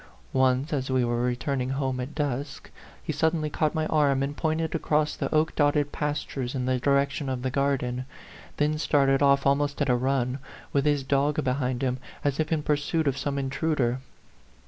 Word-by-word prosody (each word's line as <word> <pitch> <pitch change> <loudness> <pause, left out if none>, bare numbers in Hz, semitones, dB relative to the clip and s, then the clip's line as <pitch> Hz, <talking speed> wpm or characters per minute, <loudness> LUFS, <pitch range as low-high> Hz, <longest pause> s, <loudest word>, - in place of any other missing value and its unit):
Once, 130 +3 +2
as 135 -2 -1
we 130 -2 +2
were 120 - -1
O - - +1
/ - - +2
returning 130 +1 -1
home 135 -1 -1
at 130 +4 -5
dusk, 140 -1 -3 0.3
he 155 - -3
suddenly 155 0 0
caught 155 +2 0
my 155 0 0
arm 145 -4 +2
and 140 +1 -3
pointed 160 +1 -1
across 155 -2 +1
the - - -3
oak 155 +1 +2
dotted 145 -1 +2
pastures 145 -3 -3
in 125 -1 -1
the 130 0 +1
direction 140 +1 +1
of 130 -1 -3
the 130 - -1
garden, 130 -2 0 0.5
then 150 +1 +1
started 135 -3 +3
off 140 -1 +4
almost 140 +1 +1
at 145 -2 +1
a 125 - +4
run, 130 +1 0 0.3
with 140 0 +2
his 145 -2 +2
dog 140 +3 +1
behind 130 -1 -1
him, 130 0 0 0.2
as 145 0 0
if 155 +1 0
in 155 -2 +1
pursuit 150 +2 0
of 135 - +2
some 140 +1 -2
in 135 -1 -1
truder. 135 -6 0
140 Hz, 195 wpm, -26 LUFS, 130-150 Hz, 0.5 s, off